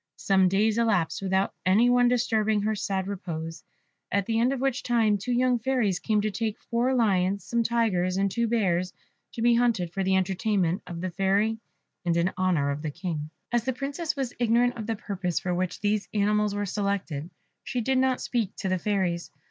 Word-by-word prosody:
Some 190 -2 +3
days 215 +4 +2
elapsed 205 -9 +1
without 190 0 0
any 205 +6 +4
one 245 0 +4
disturbing 220 -4 +1
her 215 +1 +1
sad 195 -2 -2
repose; 165 -4 -5 0.5
at 200 0 +1
the 225 +1 0
end 245 +3 +3
of 275 - -2
which 265 -1 0
time 225 -3 +2
two 225 +6 -4
young 250 0 +2
fairies 230 -7 0
came 215 -2 +1
to 215 0 -1
take 220 +1 -2
four 245 +2 0
lions, 200 -4 +2
some 235 0 0
tigers, 210 -6 +1
and 195 0 +1
two 235 +3 0
bears 185 -5 0 0.4
to 230 -3 -3
be 240 0 +5
hunted 230 -8 +1
for 195 - -1
the 190 0 +2
entertainment 190 -1 0
of 170 -1 -6
the 185 0 -3
Fairy 200 +5 +1 0.4
and 170 -1 +1
in 175 +2 +1
honour 175 -7 +1
of 140 +1 -4
the 155 - -3
King. 155 -2 -4 0.2
As 240 -1 +1
the 260 - 0
Princess 285 +6 -3
was 265 -3 -3
ignorant 240 +1 +3
of 220 -2 -6
the 225 - -1
purpose 190 -4 -3
for 180 - -2
which 180 0 -2
these 210 0 0
animals 210 0 +2
were 205 0 -1
selected, 190 -6 -2 0.3
she 250 - -3
did 260 +3 +1
not 260 -1 +2
speak 230 -6 -2
to 190 - -3
the 185 0 0
Fairies. 180 -3 -1
205 Hz, 200 wpm, -27 LUFS, 185-235 Hz, 0.5 s, be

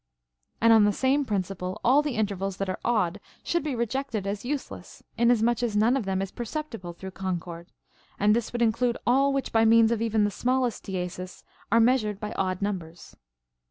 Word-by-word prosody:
And 230 0 +6
on 220 -2 +6
the 205 - +3
same 270 +5 +1
principle 190 -2 -3
all 270 +4 +5
the 295 -4 -3
intervals 195 -3 -2
that 195 - -2
are 185 - -3
odd 205 -5 0 0.2
should 340 -2 0
be 295 -4 -2
re 235 0 0
jected 235 -4 -3
as 200 +1 -3
useless, 280 +2 -6
inasmuch 235 0 +2
as 225 -4 0
none 225 +5 +4
of 265 -6 -1
them 190 0 -1
is 195 - -6
perceptible 235 - -6
through 190 +2 -9
concord; 175 -2 -5 0.5
and 210 +1 +3
this 235 -2 -2
would 240 0 0
include 235 +1 +1
all 270 +3 +3
which 275 -1 -2
by 225 0 +3
means 225 0 +5
of 230 -1 0
even 220 -2 +1
the 205 - +1
smallest 250 +1 -1
diesis 180 -1 -5 0.3
are 230 - +5
measured 225 -4 +2
by 210 0 -5
odd 185 -1 -2
numbers. 175 -5 -5
220 Hz, 195 wpm, -26 LUFS, 195-240 Hz, 0.5 s, And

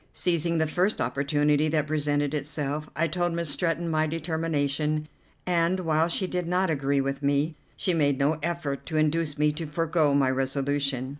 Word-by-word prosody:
Seizing 170 -1 +1
the 160 - +2
first 180 +6 0
opportunity 145 +2 +1
that 155 -1 +1
presented 145 -1 0
itself, 150 0 -3
I 165 +3 +1
told 175 +1 -1
Miss 170 -3 -2
Stretton 170 +2 -1
my 155 -1 +1
determination, 155 -2 -1 0.4
and, 180 +1 +1
while 160 -1 +2
she 175 +2 0
did 180 -2 -3
not 180 0 +1
agree 140 -1 +1
with 135 +1 -3
me, 145 +3 +1 0.2
she 185 - +1
made 145 -4 +2
no 145 +3 +1
effort 160 -4 -3
to 160 - -2
induce 155 0 +1
me 150 0 +3
to 160 +1 -5
forego 155 -1 +1
my 135 -2 +3
resolution. 135 0 -1
155 Hz, 170 wpm, -26 LUFS, 145-165 Hz, 0.4 s, me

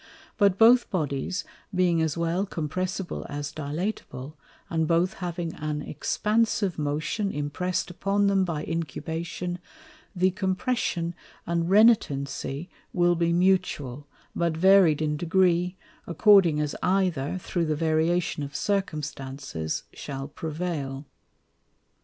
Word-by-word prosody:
But 200 -3 +3
both 235 +3 +6
Bodies 160 +1 -2 0.3
being 175 -2 +3
as 160 0 0
well 170 +4 0
compressible 185 +3 -3
as 145 +1 -4
dilatable, 155 -2 -4 0.3
and 160 -1 0
both 170 +2 +2
having 170 -2 -3
an 150 -1 -3
expansive 210 +1 0
motion 155 +8 -1
imprest 170 +6 -2
upon 200 +3 +1
them 195 -1 +3
by 165 -5 -2
Incubation, 165 +3 -4 0.6
the 185 +1 +3
Compression 185 -2 -1 0.3
and 170 0 0
Renitency 170 -8 +3 0.3
will 175 -1 +3
be 170 0 +1
mutual, 170 -7 +1 0.3
but 170 -2 0
varied 180 -4 +5
in 150 -1 0
degree, 180 +1 +2 0.3
according 175 -3 +5
as 150 -1 -1
either, 180 -5 +1
through 175 -1 -2
the 155 - +1
variation 160 +1 +1
of 140 0 -6
Circumstances, 140 - -3
shall 135 -1 -6
prevail. 150 -3 -4
170 Hz, 110 wpm, -26 LUFS, 150-185 Hz, 0.6 s, both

